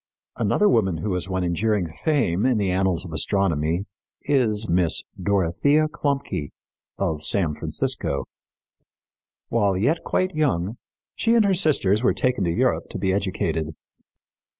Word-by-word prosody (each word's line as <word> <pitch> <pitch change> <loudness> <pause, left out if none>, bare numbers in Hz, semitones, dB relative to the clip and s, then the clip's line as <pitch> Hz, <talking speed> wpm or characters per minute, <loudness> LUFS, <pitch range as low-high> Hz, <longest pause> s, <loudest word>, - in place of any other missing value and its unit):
Another 210 - +2
woman 95 - +2
who 100 +4 -2
has 90 +1 -3
won 95 -1 -1
enduring 95 +2 0
fame 105 - 0
in 125 -2 +2
the 100 -3 0
annals 95 -1 0
of 80 - -8
astronomy 85 0 0 0.4
is 110 -7 +1
Miss 85 -2 +2 0.2
Dorothea 100 - +2
Klumpke, 140 - -2 0.5
of 80 -1 -2
San 85 -1 0
Francisco. 70 -2 -1 1.2
While 100 -5 +1
yet 140 - +1
quite 185 0 0
young, 120 - 0 0.4
she 230 0 +1
and 225 -3 +4
her 195 - +3
sisters 140 - +3
were 125 - +2
taken 125 -5 +1
to 85 - 0
Europe - - 0
to - - -5
be 95 -1 0
educated. 80 -5 -2
100 Hz, 140 wpm, -23 LUFS, 85-130 Hz, 1.2 s, and